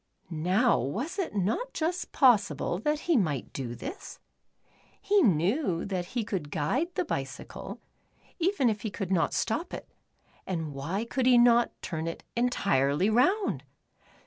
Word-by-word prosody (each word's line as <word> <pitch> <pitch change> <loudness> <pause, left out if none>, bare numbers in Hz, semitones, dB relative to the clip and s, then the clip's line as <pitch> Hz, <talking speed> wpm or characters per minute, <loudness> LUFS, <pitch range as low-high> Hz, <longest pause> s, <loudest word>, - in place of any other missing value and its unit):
Now 185 +10 +2
was 245 - -3
it 355 - -2
not 215 - -1
just 345 +3 -2
possible 205 - +3
that 300 +6 0
he 340 - +1
might 155 - 0
do 120 -3 -4
this? 370 - -8 0.8
He 405 0 +3
knew 190 - +2
that 185 -3 -2
he 235 - +1
could 185 -8 -4
guide 260 - -1
the - - 0
bicycle, - - -5 0.6
even 345 -6 +2
if 215 -2 0
he 220 - -3
could 195 -2 -5
not 165 -5 +2
stop 310 +11 -1
it, - - -9 0.6
and 160 -5 -3
why 165 +11 -3
could 250 +2 0
he 250 -1 +7
not 240 0 +4
turn 160 -1 -3
it 165 - -5
entirely 195 - +2
round 370 - +2
215 Hz, 145 wpm, -28 LUFS, 165-270 Hz, 0.8 s, he